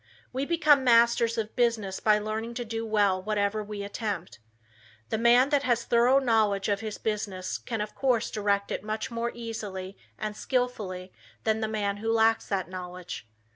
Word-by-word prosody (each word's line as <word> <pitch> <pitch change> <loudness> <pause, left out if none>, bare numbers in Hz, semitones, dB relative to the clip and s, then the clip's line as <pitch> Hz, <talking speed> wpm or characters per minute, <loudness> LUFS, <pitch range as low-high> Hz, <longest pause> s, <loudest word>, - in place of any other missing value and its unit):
We 270 +2 -2
become 305 -5 +4
masters 235 -1 +4
of 220 -1 -3
business 225 -6 +1
by 215 -1 +4
learning 220 +2 -4
to 240 0 -3
do 225 0 -4
well 205 -3 +2
whatever 210 +1 0
we 205 -1 -6
attempt. 200 - -4 0.7
The 220 - -1
man 240 +3 +5
that 285 -2 +3
has 240 -3 +1
a - - -20
thorough 240 +3 +5
knowledge 220 -6 +2
of 200 -1 +1
his 215 -1 -5
business 205 -4 -3
can 225 -3 -4
of 210 0 -4
course 255 -4 +1
direct 200 -1 0
it - - -3
much 215 +3 -3
more 235 0 -2
easily 205 -5 -6 0.2
and 215 -1 -4
skillfully 210 -8 -2 0.3
than 220 0 +1
the 220 - 0
man 205 -2 -1
who 225 +2 -1
lacks 225 0 +3
that 190 -3 -1
knowledge. 180 -8 -7
220 Hz, 175 wpm, -28 LUFS, 200-235 Hz, 0.7 s, man